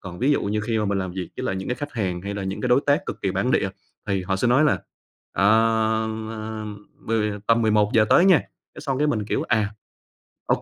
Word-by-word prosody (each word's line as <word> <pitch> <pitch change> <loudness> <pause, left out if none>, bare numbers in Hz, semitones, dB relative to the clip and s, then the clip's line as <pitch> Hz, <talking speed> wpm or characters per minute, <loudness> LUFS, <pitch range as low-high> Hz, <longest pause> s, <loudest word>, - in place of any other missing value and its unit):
Còn 90 -2 -9
ví 135 +4 +3
dụ - - +1
như 105 +1 -1
khi 110 +1 -1
mà 105 - 0
mình 100 0 0
làm 95 -2 -3
việc 95 -2 -5
với - - -4
lại 95 - -1
những 95 - -5
cái 125 - 0
khách 145 0 -6
hàng 95 -6 -2
hay 100 +1 -4
là 100 - -4
những 95 +1 -4
cái 125 - -1
đối 125 +2 +5
tác 145 +6 +2
cực - - -6
kỳ 100 - +1
bản 100 +7 0
địa 95 - +2 0.4
thì 95 -1 0
họ 95 +1 -1
sẽ 120 +5 +1
nói 130 +5 +4
là 150 - +2 0.5
"Ờ, 100 - +1 0.9
ờ, 110 0 -5 0.4
mười 110 -2 +1
tầm 115 0 +3
11:00 110 +1 +3
tới 175 - +6
nha." 190 -3 +7 0.4
Cái - - -9
xong 135 -2 -2
cái 150 - +2
mình, 110 -8 0
kiểu: - - -1
"À, 110 -2 +2 0.8
OK." - - +1
110 Hz, 250 wpm, -23 LUFS, 100-125 Hz, 0.9 s, nha